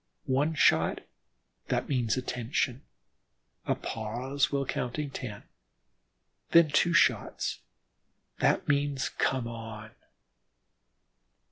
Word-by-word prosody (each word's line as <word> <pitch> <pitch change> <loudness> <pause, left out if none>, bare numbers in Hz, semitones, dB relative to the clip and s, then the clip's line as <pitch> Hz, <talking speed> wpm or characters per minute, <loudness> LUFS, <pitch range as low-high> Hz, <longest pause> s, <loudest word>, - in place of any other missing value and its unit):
One 145 +5 +1
shot: - - +3 0.7
that - - -1
means 120 -6 0
"attention," 125 +1 -1 0.9
a - - +2
pause 120 +6 -2
while 140 -1 0
counting 130 +4 -3
ten, 110 -7 -6 1.1
then 170 -2 +6
two 170 +4 +3
shots: 170 - +2 0.8
that - - +2
means 140 -1 +1
"come 130 -3 0
on." 110 -2 -8
130 Hz, 90 wpm, -29 LUFS, 115-140 Hz, 1.1 s, then